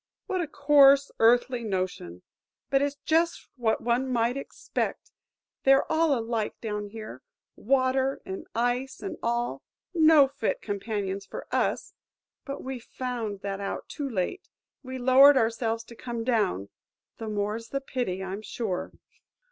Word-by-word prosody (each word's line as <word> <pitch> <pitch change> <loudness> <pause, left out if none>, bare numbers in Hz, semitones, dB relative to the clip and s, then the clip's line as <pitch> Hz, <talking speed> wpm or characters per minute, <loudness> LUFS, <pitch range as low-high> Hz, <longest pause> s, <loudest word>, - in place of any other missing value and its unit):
"What 370 -1 -1
a 330 - -2
coarse, 280 -1 +5
earthy 240 +1 +4
notion! 185 - -3 0.5
But 270 0 +4
it 285 - +2
's 285 - -15
just 335 +2 +1
what 230 -4 0
one 245 +2 +1
might 235 0 +1
expect; 275 - -4 0.5
they're 270 0 +5
all 315 -3 +3
alike 225 -2 -2
down 210 -2 -4
here, 215 - -9 0.3
Water 265 +2 +1
and 190 0 -6
Ice 245 +3 -1
and 375 -5 -5
all; 235 - -1 0.3
no 315 -4 +6
fit 270 -5 -2
companions 200 -2 -3
for - - -7
us; - - 0 0.5
but 275 0 -6
we've 260 -3 -5
found 235 -7 -4
that 200 -1 -4
out 200 - -4
too 285 -2 -4
late. 225 - -3 0.3
We 260 -1 -6
lowered 265 +3 +7
ourselves 225 -1 0
to 235 - -13
come 235 -1 -5
down,–the 220 - -3
more 210 +1 -1
's 230 0 -13
the 275 - -1
pity, 245 -9 -3
I'm 190 +2 -5
sure!" 215 -4 -3
240 Hz, 145 wpm, -27 LUFS, 210-270 Hz, 0.5 s, lowered